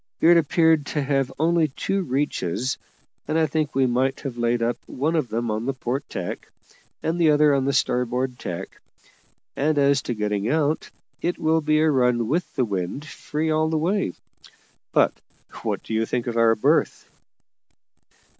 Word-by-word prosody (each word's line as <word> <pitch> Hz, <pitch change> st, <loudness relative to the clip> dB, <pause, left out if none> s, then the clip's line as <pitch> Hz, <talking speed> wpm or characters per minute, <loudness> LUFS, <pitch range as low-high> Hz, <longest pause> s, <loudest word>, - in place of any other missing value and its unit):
It 175 Hz, +1 st, +6 dB
appeared 160 Hz, -2 st, +3 dB
to 150 Hz, -, -1 dB
have 135 Hz, -1 st, 0 dB
only 165 Hz, +1 st, +3 dB
two 195 Hz, +7 st, -2 dB
reaches, 130 Hz, -, -1 dB, 0.5 s
and 155 Hz, -, 0 dB
I 160 Hz, -, +4 dB
think 155 Hz, -1 st, -2 dB
we 135 Hz, -1 st, +3 dB
might 130 Hz, +2 st, 0 dB
have 135 Hz, -4 st, -5 dB
laid 120 Hz, 0 st, 0 dB
up 120 Hz, +1 st, -1 dB
one 155 Hz, +6 st, -1 dB
of 155 Hz, -6 st, +1 dB
them 115 Hz, +1 st, -2 dB
on 110 Hz, +3 st, -3 dB
the 135 Hz, -, -1 dB
port 130 Hz, +2 st, -3 dB
tack, 90 Hz, -2 st, -5 dB, 0.5 s
and 165 Hz, +2 st, -1 dB
the 160 Hz, -, +5 dB
other 150 Hz, -1 st, +5 dB
on 135 Hz, -1 st, +1 dB
the 140 Hz, -, +2 dB
starboard 125 Hz, -1 st, 0 dB
tack; 85 Hz, -1 st, -6 dB, 0.7 s
and 150 Hz, +2 st, +1 dB
as 140 Hz, -1 st, +3 dB
to 120 Hz, -, -3 dB
getting 105 Hz, 0 st, -1 dB
out, 155 Hz, +1 st, 0 dB, 0.3 s
it 175 Hz, -, -1 dB
will 160 Hz, +1 st, +2 dB
be 155 Hz, 0 st, +2 dB
a 160 Hz, 0 st, +4 dB
run 125 Hz, -4 st, +2 dB
with 165 Hz, +8 st, -1 dB
the 130 Hz, -4 st, +2 dB
wind 100 Hz, +7 st, -3 dB
free 155 Hz, +1 st, -3 dB
all 155 Hz, 0 st, +2 dB
the 160 Hz, -, 0 dB
way. 170 Hz, -, 0 dB, 0.8 s
But -, -, +3 dB, 0.5 s
what -, -, -2 dB
do -, -, -6 dB
you 110 Hz, 0 st, +1 dB
think 120 Hz, -1 st, -1 dB
of 120 Hz, -2 st, -3 dB
our 115 Hz, -1 st, +4 dB
berth?" 105 Hz, -, +1 dB
135 Hz, 175 wpm, -23 LUFS, 120-155 Hz, 0.8 s, It